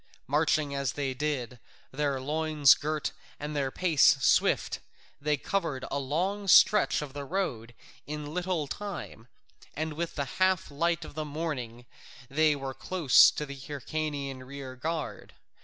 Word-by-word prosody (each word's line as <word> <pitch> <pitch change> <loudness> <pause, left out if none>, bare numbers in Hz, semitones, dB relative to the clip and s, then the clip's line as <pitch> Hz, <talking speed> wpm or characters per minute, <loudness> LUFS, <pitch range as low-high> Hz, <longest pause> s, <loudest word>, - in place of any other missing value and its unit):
Marching 150 +1 +1
as 140 -3 -1
they 140 -2 -2
did, 130 -3 -3 0.3
their 140 -1 -1
loins 150 +1 +4
girt 155 0 -2 0.3
and 150 +1 -5
their 140 -2 0
pace 160 -2 +4
swift, - - +2 0.4
they 150 0 +1
covered 155 -5 -2
a 140 - 0
long 185 +9 -2
stretch 190 -3 +5
of 140 -2 -9
road 140 - -3 0.3
in 150 0 -5
little 180 -3 -1
time, 180 - -7 0.5
and 155 +1 -2
with 165 +2 -4
the 140 - -1 0.2
half 185 -4 +2
light 165 +3 0
of - - -10
the 155 +1 -3
morning 140 -6 -5 0.5
they 155 +1 +3
were 135 -1 -5
close 170 -2 +5
to 150 - -4
the 140 -1 -8
Hyrcanian 140 -1 -4
rear 130 0 -8
guard. 145 - -4
150 Hz, 140 wpm, -29 LUFS, 135-160 Hz, 0.5 s, stretch